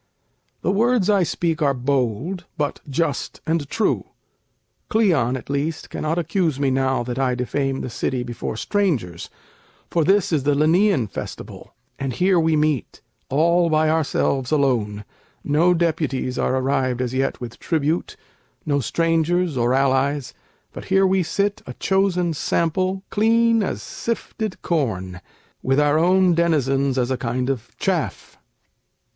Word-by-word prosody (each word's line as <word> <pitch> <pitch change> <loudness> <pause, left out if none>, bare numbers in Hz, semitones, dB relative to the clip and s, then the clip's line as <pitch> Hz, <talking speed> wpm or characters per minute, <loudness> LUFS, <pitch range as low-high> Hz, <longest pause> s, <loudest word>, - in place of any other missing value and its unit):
The - - +2
words 220 0 +2
I 200 -2 +3
speak 170 -1 -1
are 140 -2 +2
bold, 135 - -1
but 145 -1 -2
just 145 0 -2
and 160 -3 -1
true. 225 - 0 0.8
Cleon 160 - +2
at 125 - -11
least 145 +3 -3
cannot 155 +2 -2
accuse 165 -3 0
me 140 -2 +1
now, 130 -1 +1
That 125 +1 -4
I 130 -2 +1
defame 135 +2 -2
the - - -4
city 125 +1 -2
before 120 -2 -5
strangers, 140 - -1 0.6
For 170 - +2
this 195 +3 +3
is 155 -4 +2
the 145 +1 +1
Lenæan 160 - +3
festival, - - -8 0.2
And 135 -2 -2
here 180 +7 +3
we 160 -1 +2
meet, 150 -4 -1 0.3
all 170 +4 +3
by 155 0 +3
ourselves 140 -4 0
alone; 115 -8 +1 0.4
No 170 +5 +3
deputies 155 -7 -1
are - - +1
arrived 130 -1 0
as 125 -1 -2
yet 135 +1 -1
with 120 -1 -8
tribute, 160 0 -1 0.5
No 145 -2 +1
strangers 165 +3 +1
or 120 -1 +1
allies: 135 +1 +1 0.4
but - - -8
here 195 0 +3
we 190 0 +3
sit 200 +4 -1
A 125 - -7
chosen 185 -3 +1
sample, 185 +5 0
clean 230 +1 +3
as 195 - -3
sifted 220 -3 -4
corn, 95 - -2 0.4
With 135 +2 +2
our 150 +1 +3
own 180 +1 +4
denizens 140 -5 +1
as 125 0 0
a 130 - 0
kind 125 +1 -1
of 125 -5 -5
chaff. - - -2
150 Hz, 145 wpm, -22 LUFS, 130-175 Hz, 0.8 s, own